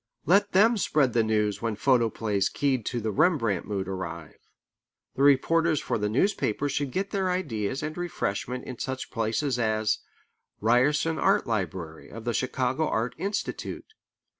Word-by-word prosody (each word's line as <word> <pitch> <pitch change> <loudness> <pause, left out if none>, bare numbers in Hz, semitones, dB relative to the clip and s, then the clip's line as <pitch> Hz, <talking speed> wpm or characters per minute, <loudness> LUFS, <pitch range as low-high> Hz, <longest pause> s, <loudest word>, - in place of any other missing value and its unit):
Let 200 +3 +3
them 220 +5 +5
spread 150 - +2
the 115 - +4
news 105 -2 0
when 115 -2 -1
photoplays 110 -5 +1
keyed 135 -6 0
to 120 - -1
the 110 -1 -2
Rembrandt 130 - +1
mood 100 -2 -2
arrive. 85 -4 -6 0.7
The - - -4
reporters 155 +3 +4
for - - -2
the 105 0 0
newspapers 140 - 0
should 145 -1 -1
get 195 +8 -2
their 190 -2 0
ideas 135 - -2
and 155 +1 -4
refreshment 125 - -3
in 125 -3 -8
such 130 0 -4
places 115 +4 -1
as 110 -1 +1 0.6
the - - -10
Ryerson 145 +7 +3
Art - - +3
Library 90 -7 -4
of 115 0 -9
the 120 - 0
Chicago 130 +4 0
Art 115 +2 -1
Institute. 205 - -4
125 Hz, 155 wpm, -27 LUFS, 110-155 Hz, 0.7 s, them